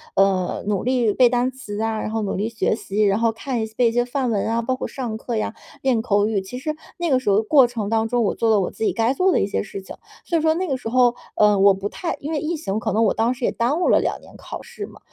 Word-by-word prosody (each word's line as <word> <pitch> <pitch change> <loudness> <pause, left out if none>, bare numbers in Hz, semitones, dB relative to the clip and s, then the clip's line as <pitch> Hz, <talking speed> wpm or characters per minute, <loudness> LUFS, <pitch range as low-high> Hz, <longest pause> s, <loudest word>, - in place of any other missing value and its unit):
呃， 190 -2 +1
努 205 -2 0
力 245 -4 +2
背 250 -2 +5
单 250 +1 +1
词 215 -6 -7
啊， 225 -1 -1
然 - - -3
后 225 0 -1
努 200 - -2
力 210 +4 -1
学 220 -1 0
习， 210 -1 -1
然 200 +1 +2
后 230 -1 +2
看 235 +1 -3
一 - - -1
些 220 - -18
背 240 -2 +4
一 - - -3
些 240 +1 +2
范 255 0 -1
文 205 -1 0
啊， 230 +1 +1
包 255 +3 -1
括 - - -4
上 235 -5 -5
课 235 0 -4
呀、 220 - -2 0.3
练 250 -4 +2
口 205 -2 +2
语， 205 -3 0
其 220 +7 -8
实 305 +4 -3 0.2
那 345 -2 -1
个 260 -2 +3
时 235 - -2
候 200 - +4
的 220 - +2
过 260 +2 +5
程 220 -4 -4
当 225 0 +1
中， 240 0 +1
我 200 - +1
做 230 - +1
了 210 - +4
我 180 - -2
自 - - -6
己 - - +1
该 230 +3 +1
做 370 +6 +2
的 - - +2
一 195 - +1
些 - - -1
事 195 -2 -7
情。 - - -10 0.3
所 340 - +1
以 - - 0
说 315 0 +3
那 370 +1 -1
个 270 -3 -1
时 225 - -5
候， 245 -1 +3 0.2
呃， 210 -1 +4
我 200 0 +6
不 195 +2 -4
太 340 - -4
因 300 +3 -4
为 300 - 0
疫 325 +3 -2
情 215 -9 -3
可 220 -1 -2
能 225 +2 +3
我 - - +2
当 230 +3 +1
时 255 -1 -3
也 - - +1
耽 275 +9 0
误 - - +2
了 - - +5
2 - - -2
年 - - -16
考 - - -8
试 410 - -8
嘛， - - -15
230 Hz, 335 characters per minute, -22 LUFS, 210-255 Hz, 0.3 s, 我